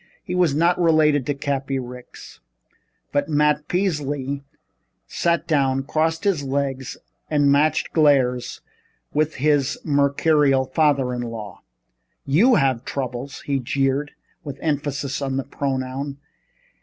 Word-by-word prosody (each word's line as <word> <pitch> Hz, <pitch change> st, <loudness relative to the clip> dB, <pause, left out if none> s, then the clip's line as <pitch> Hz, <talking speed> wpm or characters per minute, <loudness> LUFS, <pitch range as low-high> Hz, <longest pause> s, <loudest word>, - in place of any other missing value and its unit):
He 180 Hz, -, -5 dB
was 175 Hz, -6 st, +2 dB
not 175 Hz, +3 st, +2 dB
related 155 Hz, -5 st, +3 dB
to 145 Hz, -, 0 dB
Cappy 135 Hz, -1 st, -2 dB
Ricks. 125 Hz, -1 st, -10 dB, 0.7 s
But 145 Hz, +1 st, 0 dB
Matt 150 Hz, 0 st, +2 dB
Peasley 145 Hz, -7 st, -2 dB, 0.6 s
sat 170 Hz, 0 st, 0 dB
down, 135 Hz, -4 st, +1 dB
crossed 160 Hz, +3 st, 0 dB
his 195 Hz, -7 st, +1 dB
legs 135 Hz, -1 st, -3 dB, 0.3 s
and 145 Hz, -2 st, +3 dB
matched 150 Hz, +2 st, +2 dB
glares 130 Hz, -5 st, +2 dB, 0.5 s
with 155 Hz, +1 st, 0 dB
his 140 Hz, -1 st, +1 dB
mercurial 140 Hz, -1 st, +2 dB
father 135 Hz, -2 st, +1 dB
in 120 Hz, -, -3 dB
law. 115 Hz, -4 st, -7 dB, 0.6 s
"You 210 Hz, -, +4 dB
have 130 Hz, -, +1 dB
troubles!" 130 Hz, 0 st, -5 dB
he 140 Hz, -1 st, -1 dB
jeered, 135 Hz, +3 st, 0 dB, 0.3 s
with 140 Hz, -3 st, -7 dB
emphasis 145 Hz, -2 st, -2 dB
on 135 Hz, -1 st, -2 dB
the 135 Hz, -, -1 dB
pronoun. 135 Hz, +1 st, -3 dB
140 Hz, 120 wpm, -22 LUFS, 135-150 Hz, 0.7 s, You